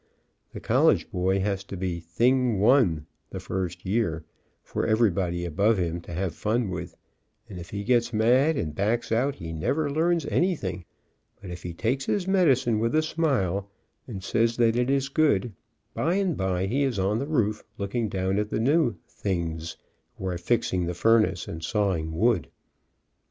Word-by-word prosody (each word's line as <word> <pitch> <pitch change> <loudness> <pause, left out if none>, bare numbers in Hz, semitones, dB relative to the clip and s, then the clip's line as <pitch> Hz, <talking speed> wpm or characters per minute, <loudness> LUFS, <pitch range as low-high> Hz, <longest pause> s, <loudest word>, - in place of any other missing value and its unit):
The - - -7
college - - +2
boy 95 +1 +1
has 100 -1 -1
to 95 - -7
be 90 -1 -2
a - - -7
"thing 120 +7 +1
1 105 - +3
" - - -47
the - - -6
first 95 -2 -4
year, 95 -6 -1 0.4
for - - -3
everybody 95 -6 +1
above 100 +7 +2
him 85 -1 -2
to 85 - -11
have 90 -1 -2
fun 110 +2 -1
with, 90 -1 -6 0.5
and 95 -5 -8
if 85 - -9
he 100 0 -4
gets 120 +1 +2
mad 125 +8 +3
and 75 - -2
backs 110 +7 -1
out, 130 +5 +1
he 80 -2 -7
never 140 - -1
learns 165 +1 +1
anything, 100 - -1 0.5
but 95 -3 -9
if 85 - -7
he 90 - -5
takes 130 +7 -1
his 190 -3 0
medicine 135 - +3
with 115 +5 0
a 155 - +3
smile, 110 - 0 0.4
and 100 -7 -7
says 115 +3 +1
that 115 -1 +3
it 125 +1 +1
is 135 0 +1
good, 135 -8 +1 0.4
by 170 +4 0
and 190 -5 +1
by 95 -1 -1
he 125 +9 0
is 135 -6 0
on 100 +3 +1
the 140 - -3
roof, 110 -9 0
looking 105 +2 -2
down 95 +1 0
at 105 0 -2
the - - -1
new 140 0 +2
"things" 85 -4 -3 0.4
who - - -7
are 90 -2 -2
fixing 90 -3 0
the 90 - -3
furnace 105 -2 +2
and 80 0 -7
saw 100 0 +1
ing 80 0 -4
wood. 110 -6 +2
105 Hz, 185 wpm, -26 LUFS, 90-125 Hz, 0.5 s, 1